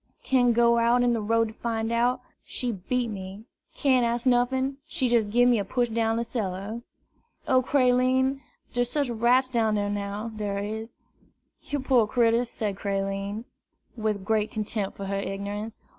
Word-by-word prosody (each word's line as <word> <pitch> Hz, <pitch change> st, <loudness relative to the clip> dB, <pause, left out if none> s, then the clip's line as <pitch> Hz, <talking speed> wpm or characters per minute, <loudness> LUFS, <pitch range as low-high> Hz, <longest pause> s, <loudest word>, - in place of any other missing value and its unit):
Can' 245 Hz, -2 st, +3 dB
go 235 Hz, 0 st, +4 dB
out 235 Hz, +1 st, +3 dB
in 240 Hz, -1 st, +3 dB
de 230 Hz, -, -1 dB
road 225 Hz, +1 st, +1 dB
to -, -, -11 dB
fine 225 Hz, -1 st, -2 dB
out, 245 Hz, +2 st, +1 dB, 0.2 s
she 250 Hz, -1 st, -3 dB
beat 230 Hz, +4 st, -2 dB
me. 195 Hz, +1 st, -7 dB, 0.3 s
Can' 260 Hz, -3 st, +3 dB
ask 235 Hz, +1 st, -1 dB
nuffin, 260 Hz, +2 st, +2 dB
she 260 Hz, -6 st, -1 dB
jest 230 Hz, -3 st, +2 dB
gib 245 Hz, +3 st, +4 dB
me 240 Hz, -3 st, +4 dB
a -, -, 0 dB
push 240 Hz, +4 st, 0 dB
down 225 Hz, 0 st, 0 dB
cellar. 215 Hz, -1 st, -4 dB, 0.7 s
O 255 Hz, -1 st, +4 dB
Creline, 260 Hz, +1 st, +2 dB, 0.3 s
der's 245 Hz, -1 st, 0 dB
sech 285 Hz, -2 st, 0 dB
rats 240 Hz, +3 st, +3 dB
down 225 Hz, -4 st, +1 dB
dar 205 Hz, 0 st, 0 dB
now, 205 Hz, +2 st, -3 dB
dar 205 Hz, -2 st, -3 dB
is!" 220 Hz, +3 st, -5 dB, 0.7 s
"Yer 290 Hz, -1 st, -3 dB
poor 255 Hz, -5 st, +3 dB
critter!" 235 Hz, +1 st, +2 dB
said 210 Hz, -4 st, -4 dB
Creline, 195 Hz, +2 st, -3 dB, 0.5 s
with 215 Hz, -4 st, -2 dB
great 215 Hz, 0 st, +1 dB
contempt 210 Hz, -2 st, -3 dB
for 200 Hz, -, -5 dB
her 195 Hz, 0 st, -2 dB
ignorance. 205 Hz, +3 st, -5 dB
230 Hz, 165 wpm, -26 LUFS, 205-245 Hz, 0.7 s, go